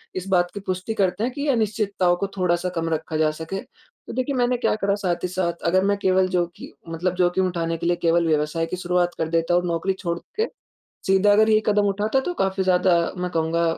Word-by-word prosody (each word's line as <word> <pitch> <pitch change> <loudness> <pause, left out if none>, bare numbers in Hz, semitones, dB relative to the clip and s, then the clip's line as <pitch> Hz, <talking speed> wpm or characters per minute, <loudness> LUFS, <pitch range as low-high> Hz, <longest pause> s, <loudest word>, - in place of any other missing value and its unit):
इस 185 +1 -4
बात 175 -2 +2
की 200 - -5
पुष्टि 185 +2 -3
करते 195 0 0
हैं 250 - 0
कि 285 - -5
ये 290 - -1
अनिश्चितताओं 205 -6 +1
को 195 +3 -2
थोड़ा-सा 180 -1 +1
कम 165 0 -1
रखा 160 0 -2
जा 155 -1 +2
सके। 160 +5 -5
तो 485 - -15
देखिए, 260 +2 -1
मैंने 245 0 +1
क्या 240 - +1
करा 200 -1 0
साथ 185 -4 -2
ही 180 - +1
साथ 175 -2 -2
अगर 185 +2 +3
मैं 200 0 +2
केवल 190 -1 +2
जोखि 175 -1 -3 0.2
मतलब 175 +2 -2
जोखिम 180 +1 +2
उठाने 165 -2 -2
के 170 - -5
लिए 175 - +3
केवल 170 0 +2
व्यवसाय 155 +1 0
की 165 - -4
शुरुआत 180 -1 0
कर 160 - -2
देता 165 +1 +1
हूँ 175 0 +3
नौकरी 170 +3 0
छोड़ 170 -2 -2 0.2
के, 450 - +2 0.6
सीधा 195 +2 +4
अगर 220 +2 +5
ये 215 0 +4
कदम 205 -1 +3
उठाता 210 +6 +1
तो 355 +7 -3
काफ़ी 190 - 0
ज़्यादा 180 0 +3 0.2
मैं 180 0 -2
कहूँगा 165 +1 0
185 Hz, 225 wpm, -23 LUFS, 170-200 Hz, 0.6 s, अगर